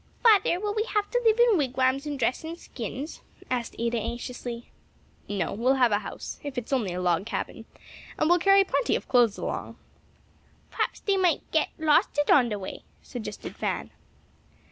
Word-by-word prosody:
"Father, 410 -6 +5
will 415 +1 -2
we 430 - 0
have 415 -1 +1
to - - +1
live 450 0 +4
in 470 -6 +5
wigwams 265 +1 +1
and 290 -1 -3
dress 250 +2 0
in 325 +1 -5
skins?" 260 - -7 0.3
asked 245 -2 -2
Ada, 235 0 0
anxiously. 235 +1 -6 0.6
"No; 200 -5 -1
we'll 245 +6 +2
have 250 -3 +4
a 205 - +3
house; 210 - -7
if 285 -3 -7
it 245 - -2
is - - -5
only 225 -8 +1
a - - -3
log 180 +2 +1
cabin, - - -4 0.5
and 310 - +2
we'll 350 +1 +5
carry 390 +2 +6
plenty 460 +5 0
of - - -4
clothes 240 -5 +4
along." - - -4 0.9
"P'raps - - -2
dey 400 -2 +1
might 360 -5 +2
det 315 - +2
losted 295 -1 +3
on 250 -4 +5
the 210 - -2
way," 190 - -7 0.2
suggested 220 -4 -7
Fan. - - -3
265 Hz, 180 wpm, -27 LUFS, 235-350 Hz, 0.9 s, carry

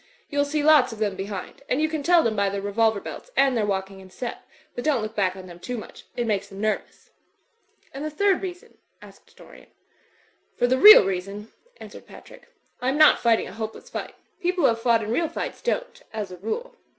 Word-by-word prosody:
You'll 285 0 +1
see 295 +1 -1
lots 295 -5 +5
of 225 - -8
them 210 -3 -1
behind; 195 +3 -7
and 255 - +1
you 310 - +2
can 310 -1 -3
tell 345 +3 +4
them 225 -2 0
by 200 -1 +1
their 200 0 -3
revolver 220 +1 +1
belts - - -9
and 270 -2 +4
their 215 -3 0
walking 190 -1 -3
in 190 0 -14
step; 240 +5 -7 0.3
but 245 - -5
don't 280 -7 +1
look 215 0 -5
back 190 -4 0
on 190 -1 -10
them 175 -1 -12
too 245 +7 -5
much. 215 - -11
It 240 - -1
makes 200 -3 -1
them 195 0 -11
nervous." 215 0 -3 0.8
"And 275 +2 -6
the 310 - -2
third 385 +5 +1
reason?" 360 -2 -8 0.2
asked - - -18
Dorian. - - -16 0.9
*Tor - - +2
the 260 +1 +1
real 420 - +10
reason," 195 +3 -4 0.3
answered - - -12
Patrick, - - -15 0.3
"I 250 - 0
am 275 - 0
not 310 -1 +6
fighting 230 -2 +2
a - - -10
hopeless 220 0 -7
fight. - - -6 0.2
People 360 0 -1
who - - +6
have 230 0 -2
fought 230 -2 +3
in 215 - -4
real 325 +6 0
fights 330 - -5
don't, - - -3
as 210 -4 -4
a 180 - -9
rule. 225 - -5
230 Hz, 220 wpm, -24 LUFS, 200-300 Hz, 0.9 s, real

